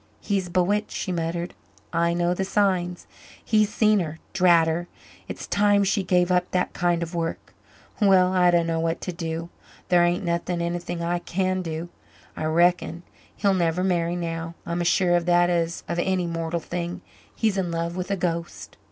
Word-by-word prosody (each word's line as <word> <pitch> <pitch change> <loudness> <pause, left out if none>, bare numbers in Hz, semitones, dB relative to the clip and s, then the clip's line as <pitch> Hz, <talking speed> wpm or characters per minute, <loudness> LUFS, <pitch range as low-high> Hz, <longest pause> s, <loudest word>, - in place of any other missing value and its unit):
"He's 195 -3 -1
bewitched," 190 +4 +1
she 190 - -4
muttered. 170 0 -2 0.4
"I 170 0 +2
know 175 0 +1
the 190 - -2
signs. 185 -3 0 0.4
He's 215 -1 +3
seen 215 -1 +3
her 160 -3 -4 0.2
drat 170 -3 +5
her! 170 +2 -1 0.4
It's - - -6
time 205 0 +3
she 200 +1 +1
gave 180 0 +2
up 180 0 +2
that 180 -1 -1
kind 175 -1 +1
of 170 +1 -7
work. 165 -1 -4 0.5
Well, 190 -2 +5
I 180 -1 +4
dunno 165 -1 +2
what 165 +1 -1
to 180 - -3
do 165 -1 -4 0.4
thar 175 -1 +5
ain't 175 +2 0
anything 170 0 -2
I 175 +1 0
can 185 +1 -1
do, 165 0 -5 0.5
I 155 - -3
reckon. 170 +1 +2 0.3
He'll 200 -1 +2
never 175 -1 +1
marry 175 -2 +1
now 165 -1 -4
I'm 170 +1 -2
as 175 - +1
sure 175 0 +3
of 175 0 0
that 175 0 +4
as 170 -1 -1
of 170 0 -2
any 185 0 0
mortal 165 0 -2
thing. 175 +2 -5 0.3
He's 220 -3 +1
in 190 -3 -1
love 170 0 -2
with 180 0 -4
a 200 - 0
ghost." 170 -1 -4
175 Hz, 180 wpm, -24 LUFS, 170-185 Hz, 0.5 s, drat